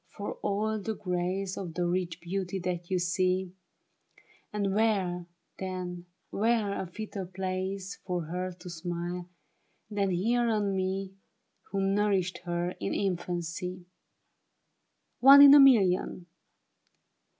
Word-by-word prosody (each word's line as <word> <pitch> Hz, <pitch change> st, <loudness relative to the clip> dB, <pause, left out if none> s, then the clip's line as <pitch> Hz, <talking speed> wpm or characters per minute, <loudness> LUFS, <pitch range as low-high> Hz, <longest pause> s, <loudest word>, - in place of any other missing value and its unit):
For -, -, -4 dB
all 215 Hz, +2 st, -1 dB
the 220 Hz, +2 st, -3 dB
grace 185 Hz, +1 st, -2 dB
Of 175 Hz, -4 st, -6 dB
the 180 Hz, -, 0 dB
rich 175 Hz, -1 st, -2 dB
beauty 185 Hz, +2 st, -3 dB
that 175 Hz, -1 st, -3 dB
you 185 Hz, -, +1 dB
see; 180 Hz, +1 st, 0 dB, 1.0 s
And 200 Hz, -2 st, -1 dB
where, 190 Hz, -5 st, +1 dB, 0.3 s
then, 180 Hz, -2 st, -5 dB, 0.2 s
where 220 Hz, -1 st, +1 dB
a 185 Hz, -, -5 dB
fitter 205 Hz, +2 st, -6 dB
place 190 Hz, +1 st, -4 dB
For 180 Hz, -2 st, -2 dB
her 180 Hz, +3 st, -4 dB
to 180 Hz, +1 st, -13 dB
smile, 175 Hz, +1 st, -5 dB, 0.6 s
than 200 Hz, -2 st, 0 dB
here 230 Hz, +7 st, +1 dB
on 205 Hz, -3 st, 0 dB
me, 190 Hz, +1 st, -2 dB, 0.6 s
Who 195 Hz, 0 st, -1 dB
nourished 195 Hz, -2 st, +1 dB
her 175 Hz, 0 st, -1 dB
in -, -, -2 dB
infancy! 180 Hz, -1 st, -3 dB, 1.4 s
One 275 Hz, +2 st, +10 dB
in 280 Hz, 0 st, +10 dB
a 290 Hz, -, +10 dB
million 195 Hz, -9 st, +4 dB
185 Hz, 120 wpm, -29 LUFS, 180-200 Hz, 1.4 s, One